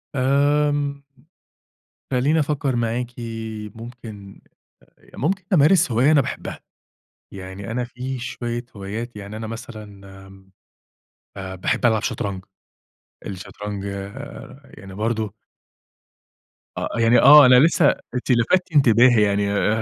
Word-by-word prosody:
آمم، 140 +1 +1 1.1
خلّيني 140 +5 +2
افكّر 140 -3 -1
معاكِ، 120 +1 -2 0.6
ممكن، 115 -4 -11 0.7
ممكن 185 - -2
أمارس 170 0 +4
هواية 125 +7 +3
أنا 145 - +5
باحبها، - - -5 0.7
يعني 95 +2 -8
أنا 125 +1 -2
في 125 +2 -6
شوية 120 -1 -5
هوايات، 105 +4 -6
يعني 105 +1 -8
أنا 110 0 -6
مثلًا 110 -1 -8 0.4
آمم، 95 0 -18 0.9
آآ 95 -1 -6
باحب 95 - -1
ألعب 110 -3 +3
شطرنج، 95 -2 -4 0.8
الشطرنج 100 +1 -7
آآ 100 0 -8 0.2
يعني 95 0 -11
برضه 110 0 -2 1.4
أ - - -2
يعني 115 +1 +5
آه، 145 +1 +9
أنا 125 0 +7
لسه 160 +1 +4 0.3
أنتِ 125 +1 -2
لفتتِ 165 +10 +2
انتباهي 120 -3 +5
يعني 100 0 +1
آآ 110 +2 +1
120 Hz, 110 wpm, -22 LUFS, 100-135 Hz, 1.4 s, آه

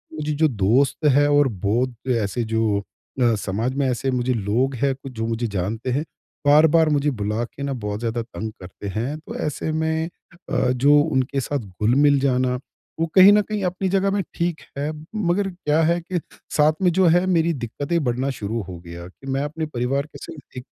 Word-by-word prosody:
मुझे 150 0 -3
जो 155 +2 +3
दोस्त 125 +6 +1
है 145 - +5
और 145 -1 +5 0.2
बहुत 120 +3 +1 0.3
ऐसे 105 +4 -2
जो 110 -2 +2
अ, 115 +3 -2
समाज 105 +5 -2
में 140 -1 +1
ऐसे 125 +2 -1
मुझे 125 0 0
लोग 120 +5 0
है 135 - +2
कुछ 135 0 -10
जो 115 0 -3
मुझे 115 +1 -1
जानते 105 +5 -3
हैं 140 +5 0 0.4
बार-बार 155 +2 +6
मुझे 145 -1 +2
बुला 105 -1 -2
के 140 +4 -9
ना 140 - -2
बहुत 105 -4 -4
ज़्यादा 115 0 -2
तंग 110 -1 -6
करते 90 +2 -9
हैं। 130 +8 -2
तो 160 - -9
ऐसे 150 +1 -2
में 160 +1 -1 0.4
अ, 125 +1 +1
जो 140 +4 +4
उनके 135 -3 0
साथ 145 +2 -2
घुल-मिल 120 +8 +2
जाना 130 -2 +1 0.4
वो 165 - +2
कहीं 195 +1 +9
न 210 - +5
कहीं 210 -1 -3
अपनी 180 +2 -1
जगह 195 +1 +2
में 200 0 +1
ठीक 170 -1 -2 0.2
है। 145 +2 -1 0.2
मगर 195 -1 +1
क्या 160 -3 0
है 170 +2 +2
कि 175 +1 -3 0.4
साथ 150 +1 +5
में 180 - +4
जो 190 - +5
है 180 +1 +3
मेरी 170 -2 +2
दिक्कतें 145 +5 -2
बढ़ना 125 +1 0
शुरू 110 +3 -2
हो 90 - -7
गया 85 0 -8
कि 115 +9 -15
मैं 135 - 0
अपने 155 +2 -3
परिवार 135 0 -1
के 150 - -13
संग - - -8 0.2
एक 125 - -5
135 Hz, 200 wpm, -22 LUFS, 115-155 Hz, 0.4 s, कहीं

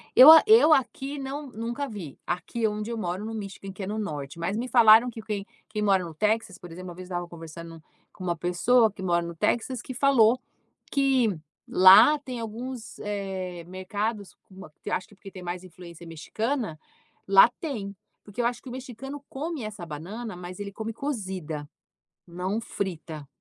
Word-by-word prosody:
Eu 270 +5 +12
a 320 - +10
eu 430 -8 +7
aqui 275 +1 -1
não 275 +2 -5
nunca 235 +5 -4
vi, 195 - -8
aqui 180 +6 -1
onde 210 +1 -4
eu 230 - -3
moro 185 0 -3
no 225 - -5
Michigan, 195 -2 -7
que 195 +1 -8
é - - -4
no 210 +2 -3
norte, 150 -7 -5
mas 180 +5 -2
me 245 +2 -2
falaram 230 -1 +7
que 225 -1 -8
quem 210 -2 -4 0.2
quem 215 0 -3
mora 195 -3 +3
no 165 -2 -7
Texas, 210 +2 0
por 175 -3 -12
exemplo, 180 +2 -8
uma 175 - -9
vez 185 +1 -9
estava 175 -1 -4
conversando 165 0 -10 0.3
com 185 - -10
uma 175 -1 0
pessoa 205 +8 +3
que 195 - -11
mora 175 -2 +2
no 170 0 -7
Texas 240 +8 0
que 260 - -7
falou 250 -3 +4 0.5
que 265 - +2 0.3
lá 200 +11 +8
tem 255 -4 -6
alguns, 230 +1 -6
eh, 190 -4 -4
mercados 200 +3 -4
com 190 - -19
uma 190 -5 -11
que - - -5
acho 185 - -1
que 205 - -19
porque 195 0 -12
tem 185 -1 -10
mais 175 +1 -5
influência 170 -1 -12
mexicana, 215 - -3 0.5
lá 195 +3 +8
tem. 215 -11 -5 0.3
Porque 205 +4 -5
eu - - 0
acho 240 0 -1
que 260 - -10
o - - -8
mexicano 265 +2 -8
come 300 0 -4
essa 210 -4 -6
banana, 185 +8 -7
mas 180 +1 -9
ele 200 -1 -5
come 220 +2 -5
cozida, 190 - -4 0.6
não 185 +5 -3
frita. 165 -8 -5
205 Hz, 190 wpm, -26 LUFS, 180-240 Hz, 0.6 s, Eu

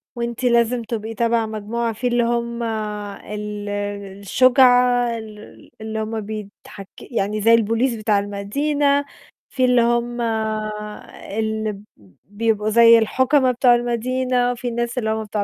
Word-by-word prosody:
وأنتِ 235 +1 -4
لازم 235 0 +2
تبقي 225 0 -5
تبع 230 0 +1
مجموعة. 220 +2 -3
فيه 230 +4 -3
اللي 240 0 +2
هُم 235 0 -2
ال 210 -1 -5 0.5
الشُجعى 245 +1 +4
ال 215 -1 -13
اللي 220 0 -4
هُم 220 0 -3
بيتحك 205 -1 -9
يعني 210 -2 -2
زي 230 +2 +6
الpolice 230 +2 0
بتاع 215 -1 +1
المدينة، 280 +9 0 0.4
فيه 260 -2 +1
اللي 250 -1 +4
هُم 240 +1 0 1.2
اللي 220 -2 -2 0.4
بيبقوا 215 +1 -1
زي 230 +1 +7
الحُكما 260 +4 +2
بتاع 245 0 +4
المدينة، 245 +1 0
وفيه 245 0 -4
ناس 235 +1 -3
اللي 220 -3 -1
هُم 220 0 -1
بتوع 210 -1 -3
230 Hz, 130 wpm, -21 LUFS, 215-245 Hz, 1.2 s, زي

